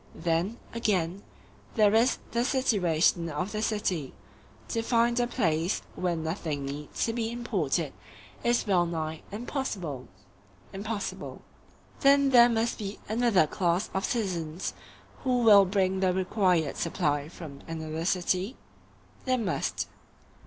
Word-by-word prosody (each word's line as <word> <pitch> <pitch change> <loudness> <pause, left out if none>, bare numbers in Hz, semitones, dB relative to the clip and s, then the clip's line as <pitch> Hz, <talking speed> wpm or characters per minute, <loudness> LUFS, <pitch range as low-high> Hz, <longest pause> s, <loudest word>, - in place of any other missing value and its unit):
Then, 170 +7 0 0.2
again, 195 -5 0 0.5
there 210 -3 +5
is 230 +4 +4
the 235 0 +1
situation 180 - +2
of 180 +6 -3
the 215 - -2
city—to 210 - -4
find 235 +1 +2
a 240 - +2
place 170 -7 0
where 180 -2 -1
nothing 160 -3 -3
need 145 +2 -6 0.2
be 230 -1 -2
imported 180 - -1 0.5
is 240 0 +2
wellnigh 170 -5 0
impossible. 200 - -4 0.7
Impossible. 205 +2 -5 0.6
Then 275 0 +5
there 240 -1 +8
must 230 0 0
be 205 -1 -5
another 220 -5 +3
class 175 +4 0
of 190 - -1
citizens 180 -7 -2 0.5
who 250 -2 +2
will 205 -3 +8
bring 190 0 +1
the 185 -1 +3
required 180 -5 +1
supply 145 0 0
from 155 -5 -10
another 160 0 -4
city? 185 +5 0 0.7
There 255 -1 +2
must. 210 -7 -1
190 Hz, 115 wpm, -28 LUFS, 165-230 Hz, 0.7 s, there